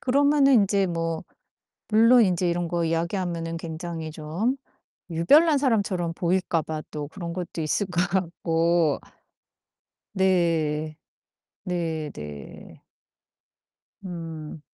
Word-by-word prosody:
그러면은 280 +1 +4
인제 200 -3 +3
뭐 165 -2 -2 0.6
물론 230 +2 +6
인제 180 -1 +1
이런 170 0 -1
거 170 0 0
이야기하면은 165 0 -2
굉장히 165 -1 -5
좀 165 - -2 0.5
유별난 290 - +5
사람처럼 200 -10 0
보일까 175 -1 0
봐 155 0 -5
또 150 -1 -5
그런 170 +1 -6
것도 175 -2 -5
있을 160 +6 0
것 180 -2 0
같고. 170 -3 +1 1.1
네. 165 -5 +1 0.7
네, 165 -5 -2
네. 75 -2 -10 1.2
음. 165 -4 -7
170 Hz, 200 characters per minute, -25 LUFS, 160-190 Hz, 1.2 s, 물론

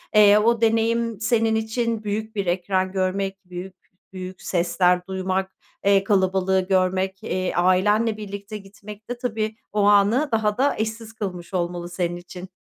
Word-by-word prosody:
Eee, 210 0 +7
o 230 +2 +2
deneyim 230 -1 +1
senin 225 -1 +2
için 220 0 -1
büyük 215 +2 -3
bir 200 -2 -1
ekran 185 +1 0
görmek, 195 +1 -2
büyük 180 +1 -8 0.4
büyük 185 0 -7
sesler 180 0 +1
duymak, 190 0 -2 0.3
eee, 195 -1 +4
kalabalığı 190 -1 +2
görmek, 190 +1 0
eee, 185 -4 -2
ailenle 205 +5 +3
birlikte 200 0 -7
gitmek 210 +2 -12
de 245 - -3
tabii, 220 -3 -2 0.2
o 210 0 0
anı 205 +8 +4
daha 215 -2 +1
da 275 +3 +2
eşsiz 220 +1 -4
kılmış 190 -4 -6
olmalı 175 -1 -2
senin 175 -1 -2
için. 180 +1 -10
200 Hz, 145 wpm, -23 LUFS, 185-220 Hz, 0.4 s, Eee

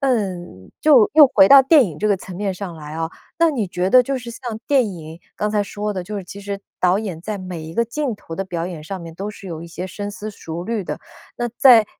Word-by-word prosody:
嗯， 185 - -2
就 270 -8 +6
又 305 -2 +9
回 195 -2 +7
到 275 -1 +9
电 285 0 +6
影 155 -4 -8
这 215 - +1
个 200 - +3
层 180 -1 -9
面 200 -1 -1
上 185 -2 -6
来 150 -1 -9
啊， 165 0 -2 0.3
那 335 -1 +4
你 240 -9 -1
觉 180 +1 -1
得 250 +5 +7
就 270 +1 -2
是 240 -1 -8
像 240 -3 -6
电 260 -7 +3
影， 160 -1 -9 0.2
刚 210 - -1
才 210 -1 +1
说 210 +1 -4
的， 185 - -4
就 210 +4 -6
是 190 - -7
其 200 +3 -10
实 200 0 -5 0.2
导 180 +2 +3
演 190 -7 -5
在 210 +3 -4
每 180 -3 -6
一 160 - -8
个 235 +7 +1
镜 250 +1 -2
头 165 - -9
的 195 - -2
表 170 -3 -3
演 170 -4 -7
上 190 +3 -6
面 165 -1 -9
都 200 +4 -5
是 200 - -12
有 165 -2 -6
一 - - -8
些 180 +2 -6
深 205 +2 -5
思 210 +1 -7
熟 170 -3 -7
虑 225 0 -2
的。 - - -5 0.4
那 240 0 -2
在 235 -5 +7
200 Hz, 280 characters per minute, -21 LUFS, 175-230 Hz, 0.4 s, 又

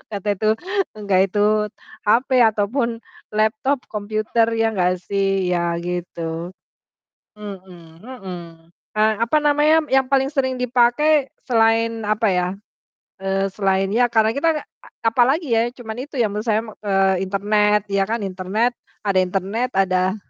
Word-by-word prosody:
kata 200 +1 -6
itu 215 +2 0 0.5
enggak 200 -3 +1
itu 210 +2 +1 0.4
HP 255 +4 +3
atau 210 -2 +1
pun 235 -3 -1 0.3
laptop, 220 +5 +1
komputer, 215 +2 0
ya 225 0 +1
enggak 180 -3 +1
sih, 195 -2 0
ya 170 -1 0
gitu. 175 0 -5 0.8
Mhm 185 -5 -11
mhm, 200 -8 -8 0.6
eee, 215 +1 +4
apa 240 +6 0
namanya 300 +2 +4
yang 265 0 +3
paling 270 0 +3
sering 260 -3 -1
dipakai 250 +4 +2 0.2
selain 225 -1 +2
apa 215 +1 +1
ya, 180 -2 +1 0.7
eee, 195 0 -1
selain 195 -1 0
ya 240 +3 +3
karena 220 -2 +2
kita 280 +7 +1
a - - -23 0.2
apalagi 255 +6 +2
ya, 230 +1 +3
cuman 225 -3 -7
itu 285 +3 -8
ya 230 -5 +1
menurut 210 +3 -4
saya 220 0 +2
me 220 - -9
eee, 195 -2 +1
internet, 210 +1 +2
ya 195 -1 +1
kan, 225 0 -2
internet, 195 +5 -1 0.3
ada 200 -2 +2
internet, 195 +6 -1
ada 185 0 +2
215 Hz, 140 wpm, -21 LUFS, 195-235 Hz, 0.8 s, eee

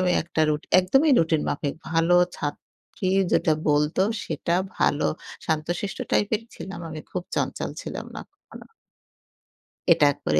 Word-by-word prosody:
আমি 185 -1 +2
একটা 165 -1 -3
রুট 150 0 0 0.2
একদমই 270 +12 +3
রুটিন 160 -2 +2
মাফিক 145 -1 -2 0.2
ভালো 165 +1 +3 0.2
ছাত্রী 145 +5 -6 0.3
যেটা 160 - +3 0.2
বলতো 150 +3 +2 0.2
সেটা 165 +2 -2 0.3
ভালো 145 - +2 0.4
শান্তশিষ্ট 165 +5 -2
টাইপেরই 220 +2 +1
ছিলাম। 190 -2 -7
আমি 155 -1 -6
খুব 180 - -3
চঞ্চল - - -2
ছিলাম - - -6
না - - -5
কখনো। - - -14 1.3
এটা 155 -3 +3
এক - - -23
করে 75 0 +3
165 Hz, 140 wpm, -25 LUFS, 150-185 Hz, 1.3 s, একদমই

